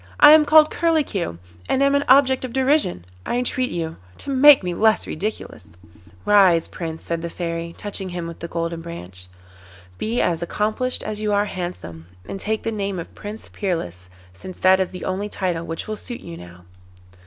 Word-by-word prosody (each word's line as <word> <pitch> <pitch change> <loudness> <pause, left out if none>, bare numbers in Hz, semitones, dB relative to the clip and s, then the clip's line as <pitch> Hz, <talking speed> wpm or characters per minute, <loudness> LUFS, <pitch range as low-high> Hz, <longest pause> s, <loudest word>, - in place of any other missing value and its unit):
I 295 - +10
am 310 0 +7
called 310 +1 +6
Curlicue, 290 - 0 0.3
and 265 - +2
am 280 0 +3
an 280 0 +2
object 265 -1 +5
of 250 -2 -5
derision; 265 - +1 0.2
I 240 - -2
entreat 250 +1 -1
you 165 -2 -4 0.2
to 280 - -6
make 275 -2 +7
me 180 -1 -2
less 220 +4 +3
ridiculous.' 205 - -6 0.5
'Rise, 190 -5 +5
Prince,' 165 -2 -6
said 170 -1 -3
the 170 - -4
Fairy, 170 -1 -5
touching 200 -2 -4
him 175 -1 -5
with 170 -1 -8
the 170 - -5
Golden 165 0 -3
Branch. 95 - -6 0.7
'Be 230 +3 -1
as 170 -2 0
accomplished 215 +8 -1
as 215 -1 -4
you 210 -1 -1
are 205 0 +2
handsome, 130 - -7 0.2
and 195 - -6
take 220 +2 -2
the 225 - -2
name 200 -3 -3
of 170 - -7
Prince 210 +1 -8
Peerless, 90 - -4 0.2
since 185 - -10
that 190 0 +4
is 190 - 0
the 180 - -8
only 195 +3 -2
title 175 -5 -2
which 165 0 -5
will 215 - -3
suit 240 +3 -5
you 170 - -9
now. 90 - -13
190 Hz, 190 wpm, -22 LUFS, 170-235 Hz, 0.7 s, I